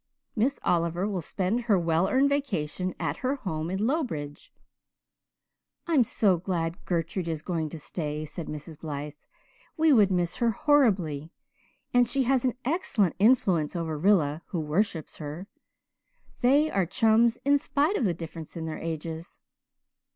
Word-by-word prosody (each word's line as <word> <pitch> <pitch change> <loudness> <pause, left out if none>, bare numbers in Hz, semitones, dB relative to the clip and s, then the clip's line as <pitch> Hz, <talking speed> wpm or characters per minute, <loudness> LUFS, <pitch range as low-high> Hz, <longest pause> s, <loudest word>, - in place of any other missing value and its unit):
Miss 255 +5 +1
Oliver 170 +2 +1
will 195 -4 -2
spend 195 +8 -1
her 210 -4 +4
well 170 +1 +1
earned 270 +2 +4
vacation 185 - -2
at - - -2
her 260 +2 -1
home 165 - -4
in 190 +4 -1
Lowbridge.'" 220 - -3 1.3
"I'm 315 -7 +4
so 200 -5 +2
glad 170 0 -3
Gertrude 170 +1 -2
is 160 -2 -3
going 165 -4 -2
to 165 - -7
stay," 150 0 -4
said 155 +2 -7
Mrs. 150 +1 -8
Blythe. 150 -2 -5 0.6
"We 320 -1 +5
would 210 -6 +5
miss 180 -2 0
her 235 - +2
horribly. 195 - +2 0.6
And 245 -1 +4
she 270 +1 +1
has 260 0 +2
an 255 -2 +1
excellent 245 - +1
influence 190 - +3
over 165 -2 -2
Rilla 155 -3 +2
who 175 - -3
worships 160 +1 -1
her. 155 +4 -6 1.0
They 285 +5 +4
are 190 -3 +1
chums, 225 +4 +3
in 285 0 +4
spite 300 +6 +1
of 250 - +1
the 175 -4 +1
difference 165 0 -8
in 160 - -4
their 160 -1 -5
ages." 165 +1 -5
180 Hz, 150 wpm, -27 LUFS, 160-240 Hz, 1.3 s, We